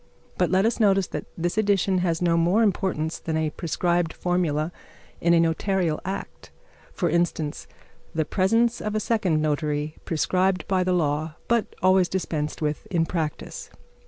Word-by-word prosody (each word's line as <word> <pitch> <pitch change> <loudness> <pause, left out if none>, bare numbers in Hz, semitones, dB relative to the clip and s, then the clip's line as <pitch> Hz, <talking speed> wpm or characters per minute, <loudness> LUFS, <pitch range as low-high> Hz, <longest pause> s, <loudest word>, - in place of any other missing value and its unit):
But - - +1
let 190 +2 +3
us 230 +1 +1
notice 195 -3 +4
that - - -5
this 175 +5 -1
addition 195 -3 +2
has 175 -1 0
no 170 -1 +3
more 175 +7 +3
importance 185 -6 0
than 160 -1 -2
a 155 -1 0
prescribed 170 +1 0
formula 170 -3 0 0.5
in 170 0 +4
a - - +5
notarial 165 0 +1
act; 190 +2 -6 0.4
for 175 - -1
instance, 165 -2 -1 0.5
the 160 -1 +1
presence 225 +7 +2
of 215 0 -3
a - - +2
second 190 -9 +1
notary 150 0 -1
prescribed 185 +3 0
by 185 -1 +2
the 180 0 +1
law, 155 -2 0
but 235 -2 0
always 185 -1 +4
dispensed 155 -5 -2
with 150 0 -2
in 165 -3 +1
practice. 160 -3 -4
175 Hz, 160 wpm, -25 LUFS, 160-190 Hz, 0.5 s, a